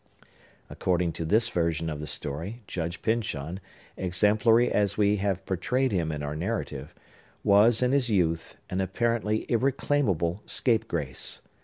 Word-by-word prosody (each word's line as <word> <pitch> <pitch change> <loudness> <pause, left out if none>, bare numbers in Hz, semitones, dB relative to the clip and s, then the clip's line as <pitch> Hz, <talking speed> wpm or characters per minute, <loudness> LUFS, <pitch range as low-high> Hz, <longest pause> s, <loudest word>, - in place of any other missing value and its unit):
According 90 -2 0
to 80 - -4
this 110 +7 +3
version 85 -3 0
of 75 -2 -3
the 75 - -5
story, 85 - -5
Judge 85 -2 -4
Pyncheon, 95 -7 -1 0.4
exemplary 105 +6 +3
as 105 -1 +1
we 105 0 +3
have 95 -1 -1
portrayed 125 +8 0
him 85 -5 0
in 75 -1 -4
our 75 +1 -3
narrative, 75 -6 -4 0.5
was, 110 +4 +5
in 125 - +2
his 135 -3 +2
youth, 85 -5 0
an 95 +1 0
apparently 110 +1 0
irreclaimable 110 - +1
scapegrace. 85 - -1
95 Hz, 135 wpm, -27 LUFS, 85-115 Hz, 0.5 s, was